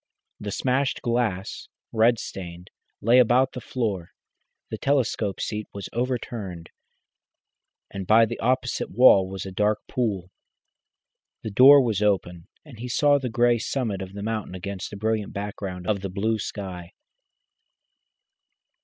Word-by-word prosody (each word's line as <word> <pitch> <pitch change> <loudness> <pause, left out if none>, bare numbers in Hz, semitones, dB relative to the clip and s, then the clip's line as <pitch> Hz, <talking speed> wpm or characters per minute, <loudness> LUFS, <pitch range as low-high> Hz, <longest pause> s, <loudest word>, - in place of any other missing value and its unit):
The 105 - -5
smashed 130 +5 0
glass, 115 -6 -2 0.2
red 115 +1 +3
stained, 90 -4 -8 0.3
lay 120 +4 +5
about 125 +2 +4
the 125 - -6
floor, 105 -9 -3 0.6
the - - -3
telescope 120 -8 0
seat 105 0 -3
was 100 - -6
overturned, 115 -8 -4 1.2
and 95 -2 -6
by 115 +1 +6
the - - -6
opposite 130 -1 0
wall 95 -4 +6
was 95 0 -6
a 95 - -6
dark 105 +2 +1
pool. 100 -7 -2 1.1
The 110 - -4
door 135 +6 +8
was 110 -5 -1
open, 90 -5 0 0.2
and 130 -7 -13
he 125 - -5
saw 145 +3 +3
the 130 -2 -3
grey 120 +1 +3
summit 110 -5 -2
of 95 0 -7
the 100 0 -6
mountain 110 -3 -3
against 95 +1 -6
a 100 - -7
brilliant 110 0 -1
background 100 -3 -5
of 100 0 0
blue 110 +2 0
sky. 90 -4 -6
105 Hz, 135 wpm, -25 LUFS, 95-120 Hz, 1.2 s, door